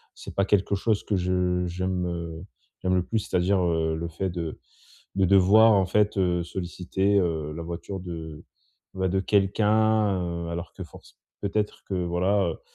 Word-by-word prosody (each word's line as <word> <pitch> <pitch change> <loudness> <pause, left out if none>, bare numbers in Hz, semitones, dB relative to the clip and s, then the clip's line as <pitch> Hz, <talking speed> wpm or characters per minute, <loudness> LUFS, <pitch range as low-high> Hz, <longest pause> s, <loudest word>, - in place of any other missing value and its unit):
c'est - - -9
pas 100 - +2
quelque 100 0 +2
chose 105 +1 0
que 105 - -1
je 90 0 0
j'aime 85 -2 -3 0.4
j'aime 95 0 +1
le 90 - +2
plus, 110 +5 -1
c'est-à-dire, 95 -1 +1
heu, 80 -2 +1
le 85 +1 -3
fait 90 +3 -3
de 85 -3 -5 0.6
de 95 -1 +2
devoir, 100 +4 +6
en 95 -2 +3
fait, 105 +3 +2
heu, 90 -2 +1
solliciter, 95 +3 -1
heu, 80 -4 -1
la 85 - -5
voiture 85 +3 -6
de, 80 -4 -7 0.5
bah, 95 -1 0
de 95 +1 +1
quelqu'un, 105 +1 +2
heu, 85 -1 -4
alors 85 +1 -5
que 95 - -7
force 80 - -16 0.2
peut-être 105 +1 -2
que 95 - -4
voilà, 95 +4 +1
heu, - - -8
90 Hz, 170 wpm, -26 LUFS, 85-100 Hz, 0.6 s, devoir